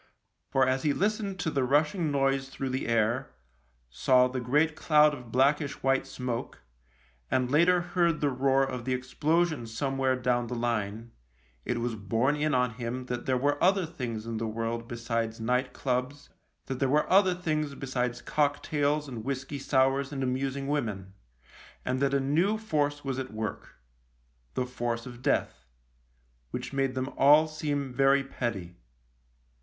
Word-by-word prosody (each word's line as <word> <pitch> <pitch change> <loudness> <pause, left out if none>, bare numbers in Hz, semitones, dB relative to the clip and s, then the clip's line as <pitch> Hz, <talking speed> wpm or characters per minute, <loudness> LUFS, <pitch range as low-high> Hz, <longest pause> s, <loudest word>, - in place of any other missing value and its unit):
For 135 -1 +3
as 130 +1 +1
he 145 0 +2
listened 200 0 -1
to 160 - -1
the 135 -3 +1
rushing 150 +5 +2
noise 135 -1 +1
through 135 0 -4
the 130 +1 -2
air, 115 +3 +1 0.6
saw 125 - +4
the 130 0 -4
great 150 +6 +2
cloud 150 -2 +4
of 125 -5 -9
blackish 140 +3 +1
white 135 0 +2
smoke, 120 - -5 0.7
and 130 -1 +1
later 175 +4 +4
heard 170 -2 +1
the 145 -1 +1
roar 135 +1 +2
of 130 -3 -3
the 130 -1 +1
explosion 150 +2 0
somewhere 135 +3 0
down 120 -1 0
the 125 - -4
line, 115 -1 -2 0.5
it 120 - -1
was 120 0 -2
borne 115 +7 0
in 150 -1 0
on 125 -1 +2
him 120 +2 -5
that 125 -1 -5
there 130 -1 +2
were 145 +3 0
other 190 0 +4
things 120 -9 -5
in 115 -1 -4
the 115 +1 -2
world 115 +1 -3
besides 115 -1 -3
night 125 +3 0
clubs, 130 +2 -3 0.4
that 130 -1 -4
there 135 - +1
were 150 +2 +2
other 190 -1 +4
things 155 -5 -2
besides 125 -3 -3
cocktails 145 0 0
and 120 -5 -6
whisky 135 +2 -4
sours 135 +1 +2
and 135 -2 -3
amusing 135 +2 -2
women, 105 -10 -2 0.7
and 130 +1 0
that 140 0 +2
a - - +3
new 165 +10 +2
force 145 -9 -1
was 135 -1 -2
at 130 0 -5
work 110 0 -5 0.4
— - - -40
the 125 - 0
force 120 -2 -3
of 120 -1 -10
Death 65 - -1 0.4
— - - -40
which - - -5
made 135 -1 0
them 130 0 -1
all 150 +3 +6
seem 145 -4 -3
very 135 +1 +4
petty. 110 -10 -4
130 Hz, 165 wpm, -28 LUFS, 120-145 Hz, 0.7 s, all